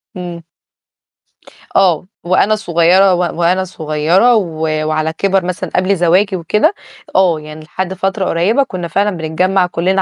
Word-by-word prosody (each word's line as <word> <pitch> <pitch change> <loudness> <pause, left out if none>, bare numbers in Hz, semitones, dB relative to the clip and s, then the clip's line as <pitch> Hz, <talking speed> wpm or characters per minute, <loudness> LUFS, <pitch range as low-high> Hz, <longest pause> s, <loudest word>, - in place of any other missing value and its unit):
إمم. 175 -2 -7 1.3
آه، 180 -3 +3 0.2
وأنا 190 +4 +2
صغيرة 180 0 +3
و 175 - 0
وأنا 175 +1 0
صغيرة 170 +7 +1
و 170 -7 -2 0.3
وعلى 155 +1 -1
كِبَر 195 -2 +1
مثلًا 180 0 -4
قبل 185 +2 +2
زواجي 185 +3 +2
وكده، 210 - +1 0.4
آه، 180 -4 +3
يعني 155 +1 -11
لحد 185 +4 -4
فترة 190 +1 -2
قريّبة 200 +12 +1
كُنّا 185 -9 -6
فعلًا 200 +3 0
بنتجمّع 180 +4 0
كُلّنا 185 +3 0
180 Hz, 140 wpm, -15 LUFS, 170-195 Hz, 1.3 s, آه